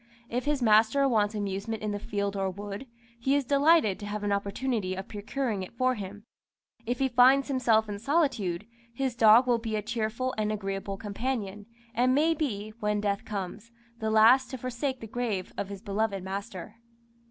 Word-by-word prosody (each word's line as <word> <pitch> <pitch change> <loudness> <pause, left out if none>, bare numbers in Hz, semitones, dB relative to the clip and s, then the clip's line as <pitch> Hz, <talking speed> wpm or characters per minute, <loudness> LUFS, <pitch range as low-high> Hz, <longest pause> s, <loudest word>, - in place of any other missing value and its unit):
If 245 +3 -2
his 290 -3 0
master 225 +5 +4
wants 215 -4 +1
amusement 205 +2 -3
in 210 - -1
the 205 - -3
field 200 -1 -2
or 195 -1 0
wood, 205 +5 -7 0.3
he 270 +4 +2
is 285 -2 +1
delighted 280 - +4
to 205 - -6
have 210 0 -4
an 205 - 0
opportunity 200 0 -1
of 190 +1 -6
procuring 215 +1 -3
it 185 +5 -9
for 255 +1 +2
him; 205 -1 -8 0.6
if 245 +1 0
he 270 - +2
finds 260 +2 +5
himself 230 -5 +3
in 205 -1 -5
solitude, 225 - 0 0.3
his 265 -1 -1
dog 225 +2 +7
will 240 -2 +2
be 225 -1 -3
a 210 - -2
cheerful 230 +4 -2
and 215 0 0
agreeable 195 -1 -4
companion, 210 -1 -4 0.3
and 250 +2 +3
maybe, 285 -9 0
when 210 -1 0
death 200 -1 -1
comes, 205 +2 -5 0.3
the 220 -1 -1
last 225 +4 +6
to 260 - -5
forsake 255 +2 -3
the - - -6
grave 220 -5 -3
of 200 - -4
his 200 0 -8
beloved 200 -2 -1
master. 195 +2 -6
220 Hz, 180 wpm, -28 LUFS, 200-255 Hz, 0.6 s, dog